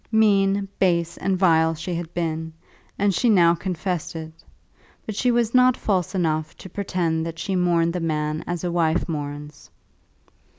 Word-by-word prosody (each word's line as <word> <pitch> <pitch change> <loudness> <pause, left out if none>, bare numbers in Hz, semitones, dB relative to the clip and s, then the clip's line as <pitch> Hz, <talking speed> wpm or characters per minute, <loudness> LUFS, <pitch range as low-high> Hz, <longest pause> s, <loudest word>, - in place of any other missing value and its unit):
Mean, 200 -2 +3
base, 170 -2 +1
and 190 -1 0
vile 165 -3 +3
she 165 +3 -5
had 170 -1 -4
been, 160 -1 -3 0.4
and 200 -1 +2
she 240 +7 +2
now 175 -5 +5
confessed 175 -1 -3
it; 160 -1 -7 0.7
but 215 - -5
she 250 +4 +1
was 235 -2 +1
not 255 -1 +5
false 190 -2 -1
enough 155 -3 -1
to - - -10
pretend 175 -4 -1
that 165 0 -5
she 195 +3 -2
mourned 170 -2 +2
the 180 - -2
man 155 -1 -2
as 175 -1 -3
a 175 - -1
wife 170 -1 +1
mourns. 145 -2 -6
170 Hz, 165 wpm, -23 LUFS, 160-195 Hz, 0.7 s, now